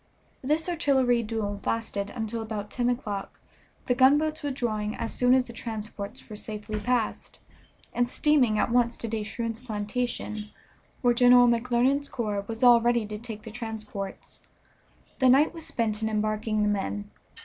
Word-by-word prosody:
This 305 +5 0
artillery 270 -8 +2
duel 210 -2 -3
lasted 205 -3 -2
until 225 0 -4
about 215 -2 -5
ten 245 -1 0
o'clock, 210 -5 -4 0.5
the 245 - +2
gunboats 295 +5 +3
withdrawing 230 -7 -2
as 230 - -4
soon 250 +1 +4
as 260 - +3
the 235 - -11
transports 215 -3 -6
were 215 - -8
safely 210 0 -5
past, 240 +1 -1 0.6
and 245 0 +1
steaming 255 -7 +3
at 230 - +1
once 240 -1 +2
to 230 - -4
De 220 -1 -2
Shroon's 225 +1 -4
plantation, 215 -1 -3 0.5
where 245 -1 +5
General 245 0 +6
McClernand's 250 +4 +2
corps 210 -4 -2
was 225 +2 -4
all 240 -1 +8
ready 235 -1 +2
to 210 0 -6
take 220 -2 -8
the 220 - -8
transports. 215 -4 -6 0.8
The 260 -1 +5
night 280 +6 +5
was 330 -2 -6
spent 220 -2 -1
in 220 - 0
embarking 215 0 0
the - - +2
men. 105 - -2
230 Hz, 160 wpm, -27 LUFS, 215-250 Hz, 0.8 s, all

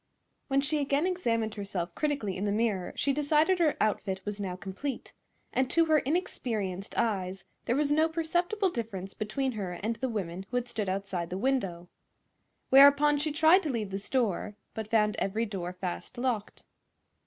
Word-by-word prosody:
When 275 0 +2
she 300 +2 +1
again 285 +2 +1
examined 230 - 0
herself 195 -5 -4
critically 275 - -1
in 195 - -2
the 205 - +1
mirror 210 -4 0
she 280 - +1
decided 305 +5 +3
her 315 -4 +3
outfit 200 -3 0
was 205 0 -4
now 190 -3 -3
complete, 195 +9 -5 0.4
and 260 0 +1
to 335 -1 +4
her 310 -1 +4
inexperienced 225 - -2
eyes 190 -4 -1 0.2
there 240 - +1
was 290 0 +1
no 315 +2 +4
perceptible 350 +4 0
difference 195 - -5
between 260 +5 -2
her 200 -6 -4
and 220 +6 -3
the 260 - -2
women 190 -4 -4
who 245 - -1
had 245 0 -1
stood 215 -5 -2
outside 190 -3 -2
the 185 - -3
window. 195 -8 -1 0.8
Whereupon 285 +2 +7
she 305 +1 0
tried 315 +5 +5
to 315 - -3
leave 220 -6 -2
the 195 - -2
store, 210 -3 -1 0.2
but 220 -1 -5
found 210 -2 +2
every 215 +4 0
door 190 -5 -4
fast 180 +6 -6
locked. 240 -4 -2
230 Hz, 175 wpm, -29 LUFS, 195-285 Hz, 0.8 s, Whereupon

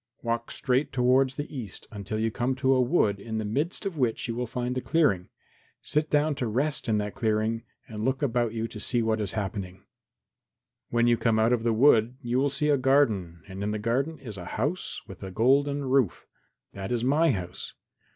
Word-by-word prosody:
"Walk 115 0 -2
straight 130 +3 0
towards 130 +1 +3
the 145 +1 -6
east 120 -6 -7
until 105 0 -5
you 110 +1 0
come 125 +4 -1
to 130 +1 +2
a 130 - +3
wood 120 - +2
in 110 +2 -5
the 110 - -2
midst 145 - -2
of 180 -6 -3
which 120 -3 0
you 115 - -2
will 125 +1 -3
find 125 +2 -3
a 130 - -1
clearing. 125 - +1 0.5
Sit 150 +1 0
down 150 +1 +2
to 130 -4 -2
rest 135 +5 -1
in 110 - +3
that 105 -1 -2
clearing 110 0 0 0.3
and 110 -1 -6
look 130 +4 0
about 120 -4 +1
you 115 0 -2
to 110 - -9
see 120 +2 +1
what 110 -1 0
is 100 0 -2
happening. 95 -3 -4 1.1
When 120 0 +2
you 120 -1 +4
come 115 -2 +2
out 110 +2 +3
of 120 - +1
the 115 0 +1
wood 120 0 +4
you 125 -2 -1
will 140 +1 +2
see 150 +2 0
a 145 - +4
garden 110 - +2
and 95 0 -7
in 100 - -1
the 105 - -1
garden 130 +9 -1
is 110 -7 -8
a 90 - -7
house 145 +11 -2
with 95 - -11
a 95 - -5
golden 140 +7 +2
roof. 130 - +1 0.5
That 95 +2 -5
is 120 -1 0
my 150 +6 +3
house. 90 -8 -4
120 Hz, 210 wpm, -27 LUFS, 110-135 Hz, 1.1 s, you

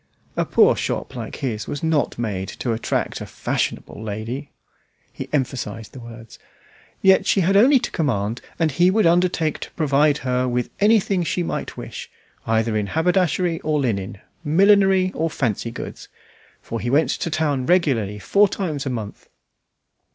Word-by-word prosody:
A - - 0
poor - - +4
shop - - -3
like - - -6
his 110 -6 -4
was 145 - -5
not 160 -2 +1
made 100 -5 -3
to 120 +3 -3
attract 110 - -2
a - - -6
"fashionable - - -3
lady"; 110 +6 -5 0.6
he - - -7
emphasized 120 -6 -3
the 130 - -9
words; 115 -1 -12 0.6
yet 190 0 +5
she 195 - +3
had 190 +3 +2
only 260 +8 +6
to 255 - -3
command, 115 - -1 0.2
and 160 -2 +1
he 175 +7 +4
would 215 +2 +2
undertake 170 -2 +2
to - - -7
provide 150 -1 +2
her 125 0 +1
with 125 -1 -1
anything 205 -3 +3
she 170 +2 -1
might - - -4
wish, - - -7 0.4
either 110 0 +1
in 105 -1 0
haberdashery 175 - +1
or 155 -1 0
linen, 100 -7 -2 0.3
millinery 190 +3 +4
or 165 +1 -1
fancy 120 -6 -2
goods, 115 - -8 0.6
for 115 - -4
he 120 +4 -3
went 145 +5 +3
to - - -2
town 145 -5 -1
regularly 130 - +2
four 200 - +3
times 155 -9 -3
a - - 0
month. 110 -5 -6
145 Hz, 160 wpm, -22 LUFS, 115-175 Hz, 0.6 s, only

